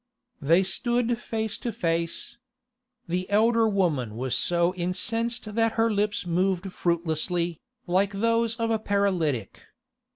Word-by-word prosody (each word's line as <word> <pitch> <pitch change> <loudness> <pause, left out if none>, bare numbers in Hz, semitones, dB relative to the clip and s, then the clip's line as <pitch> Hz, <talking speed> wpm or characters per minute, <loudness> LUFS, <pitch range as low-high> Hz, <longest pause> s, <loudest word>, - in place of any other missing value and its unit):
They 165 +6 +4
stood 240 +4 0
face 220 -2 -3
to 235 - -3
face. 170 +3 -2 0.7
The 180 +2 -2
elder 225 +2 +4
woman 160 - 0
was 130 0 -2
so 170 +5 +2
incensed 215 +5 -2
that 225 0 +2
her 225 0 +2
lips 205 -1 0
moved 185 +2 0
fruitlessly, 170 0 -1 0.3
like 190 +3 +1
those 230 +2 +1
of 230 -1 -1
a 220 - +1
paralytic. 180 - 0
195 Hz, 125 wpm, -26 LUFS, 170-225 Hz, 0.7 s, They